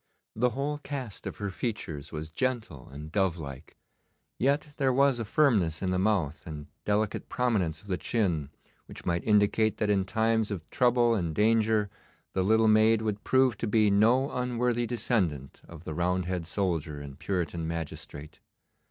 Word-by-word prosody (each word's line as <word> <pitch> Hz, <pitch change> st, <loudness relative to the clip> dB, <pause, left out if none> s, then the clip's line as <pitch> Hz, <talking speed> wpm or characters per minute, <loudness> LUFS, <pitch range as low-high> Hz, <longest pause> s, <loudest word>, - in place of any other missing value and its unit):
The 125 Hz, +3 st, +2 dB
whole 140 Hz, +4 st, -3 dB
cast 135 Hz, -8 st, -6 dB
of -, -, -6 dB
her 100 Hz, -1 st, -3 dB
features 85 Hz, -, -4 dB
was 80 Hz, 0 st, -6 dB
gentle 115 Hz, -, -3 dB
and 75 Hz, +3 st, -9 dB
dove 95 Hz, -2 st, +1 dB
like, 70 Hz, -1 st, -9 dB, 0.6 s
yet 140 Hz, +4 st, +1 dB
there 135 Hz, -2 st, +2 dB
was 135 Hz, -1 st, +3 dB
a 115 Hz, -, -2 dB
firmness 105 Hz, -, +2 dB
in 95 Hz, -, 0 dB
the 90 Hz, -, +1 dB
mouth 90 Hz, -7 st, 0 dB
and 75 Hz, -2 st, -7 dB, 0.2 s
delicate 105 Hz, 0 st, 0 dB
prominence 100 Hz, -11 st, 0 dB
of -, -, -16 dB
the 90 Hz, -2 st, -2 dB
chin 85 Hz, -, 0 dB, 0.4 s
which -, -, -11 dB
might 85 Hz, -1 st, 0 dB
indicate 105 Hz, +1 st, +3 dB
that 105 Hz, -1 st, +1 dB
in 95 Hz, -2 st, +2 dB
times 110 Hz, +1 st, +1 dB
of 90 Hz, -7 st, -5 dB
trouble 120 Hz, -2 st, +3 dB
and 85 Hz, -7 st, -1 dB
danger 110 Hz, -1 st, +3 dB, 0.5 s
the 95 Hz, -, +1 dB
little 110 Hz, +3 st, +4 dB
maid 110 Hz, +1 st, +4 dB
would 105 Hz, -1 st, -2 dB
prove 130 Hz, -4 st, +3 dB
to -, -, -2 dB
be 105 Hz, -1 st, +3 dB
no 120 Hz, +7 st, +3 dB
unworthy 125 Hz, -1 st, 0 dB
descendant 90 Hz, -, -1 dB
of 85 Hz, -1 st, -11 dB
the 80 Hz, -, -5 dB
Roundhead 90 Hz, 0 st, -1 dB
soldier 85 Hz, -6 st, -2 dB
and 70 Hz, -1 st, -9 dB
Puritan 85 Hz, -3 st, -2 dB
magistrate. 80 Hz, -2 st, -6 dB
105 Hz, 165 wpm, -28 LUFS, 85-115 Hz, 0.6 s, little